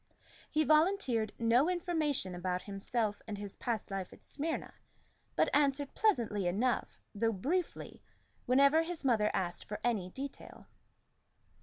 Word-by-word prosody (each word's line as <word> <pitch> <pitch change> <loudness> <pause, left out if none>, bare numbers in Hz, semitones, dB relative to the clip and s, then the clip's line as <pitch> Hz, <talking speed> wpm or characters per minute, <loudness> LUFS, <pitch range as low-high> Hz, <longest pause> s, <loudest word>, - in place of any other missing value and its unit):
He 310 +1 +2
volunteered 305 - +3
no 235 +7 +3
information 320 - 0
about 180 +1 -2
himself 205 +1 -2
and 210 -2 -4
his 200 -1 -6
past 230 -4 -3
life 195 -2 -4
at - - -15
Smyrna, 320 +3 -4 0.6
but - - +3
answered 285 -1 +2
pleasantly 230 - +1
enough, 230 +8 0
though 225 +2 +1
briefly, 320 - -2 0.5
whenever 280 +5 +5
his 330 -1 -4
mother 220 -5 +3
asked 175 -2 -2
for 210 - -5
any 215 -7 0
detail. 275 +7 -8
240 Hz, 130 wpm, -33 LUFS, 205-305 Hz, 0.6 s, whenever